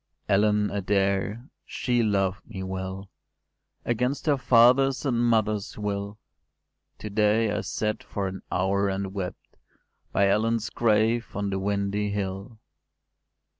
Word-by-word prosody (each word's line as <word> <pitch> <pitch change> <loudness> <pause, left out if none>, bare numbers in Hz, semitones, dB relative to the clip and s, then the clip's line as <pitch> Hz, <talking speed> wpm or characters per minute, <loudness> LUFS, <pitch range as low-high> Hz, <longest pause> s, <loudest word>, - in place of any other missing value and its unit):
“Ellen 105 +1 +2
Adair 100 +4 0 0.2
she 120 -2 -1
loved 100 -3 0
me 95 - -6
well, 95 +1 -5 0.7
Against 125 +4 -1
her 145 -3 +2
father’s 130 +2 +4
and 120 -3 +1
mother’s 110 -3 +1
will: 100 0 -3 0.8
To 105 - -7
day 105 +1 +2
I 105 +1 -1
sat 110 -1 -2
for 100 - -4
an 95 0 -6
hour 100 +2 +1
and 95 0 -3
wept, 95 -3 -6 0.5
By 100 - +3
Ellen’s 110 +2 +1
grave, 115 +1 +2
on 100 -1 -2
the 95 - -1
windy 100 +1 -1
hill. 100 +2 -4
105 Hz, 125 wpm, -26 LUFS, 100-115 Hz, 0.8 s, father’s